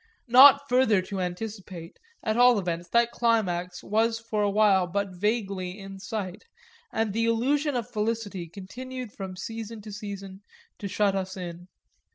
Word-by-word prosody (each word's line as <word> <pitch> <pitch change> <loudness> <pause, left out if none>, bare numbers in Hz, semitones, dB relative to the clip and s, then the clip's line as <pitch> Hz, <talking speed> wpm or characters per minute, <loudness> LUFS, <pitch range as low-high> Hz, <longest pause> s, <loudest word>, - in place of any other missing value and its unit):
Not 280 +3 +8
further 250 -5 +4
to 195 +1 -5
anticipate, 180 -2 -6 0.2
at 220 -1 0
all 245 0 +6
events, 175 -3 -3
that 235 +2 +3
climax 185 -7 0
was 225 +2 +1
for 225 -2 -3
a 205 - +2
while 200 -3 +4
but 200 +2 -2
vaguely 195 -2 -2
in 195 -1 -9
sight, 200 -2 -5 0.5
and 220 -2 -1
the 230 +1 +1
illusion 275 +6 +1
of 235 -3 -2
felicity 210 -4 -3
continued 245 +7 -8
from 190 -2 -6
season 225 +2 -6
to 215 - -8
season 200 -2 -7 0.4
to 200 - -4
shut 200 0 +1
us 190 0 -3
in. 175 -1 -7
210 Hz, 155 wpm, -27 LUFS, 190-230 Hz, 0.5 s, Not